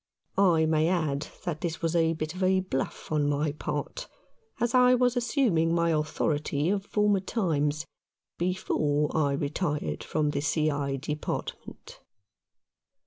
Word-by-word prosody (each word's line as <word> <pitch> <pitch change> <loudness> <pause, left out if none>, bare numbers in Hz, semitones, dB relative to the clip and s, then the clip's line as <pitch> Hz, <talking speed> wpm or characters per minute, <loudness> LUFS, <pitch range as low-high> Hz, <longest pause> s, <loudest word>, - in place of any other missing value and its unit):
I 170 -5 +4
may 155 0 +2
add 155 -5 0 0.2
that 160 -3 -3
this 170 -1 -3
was 165 +1 0
a 165 -1 +3
bit 155 0 -4
of 185 0 +1
bluff 135 +3 -3
on 150 -2 +2
my 145 +1 0
part, 150 -1 -4 0.5
as 235 0 0
I 250 0 +6
was 250 0 +2
as 245 -1 0
suming 180 - +2
my 170 0 +2
authority 150 0 0
of 200 0 -2
former 210 -2 +2
times, 155 -7 -1 0.5
before 150 -5 0
I 145 -3 +2
retired 145 - -2
from 150 -2 0
the 140 - -2
C. 155 +1 +1
I. 140 -1 -1
Department. 150 +2 -5
160 Hz, 140 wpm, -28 LUFS, 150-185 Hz, 0.5 s, I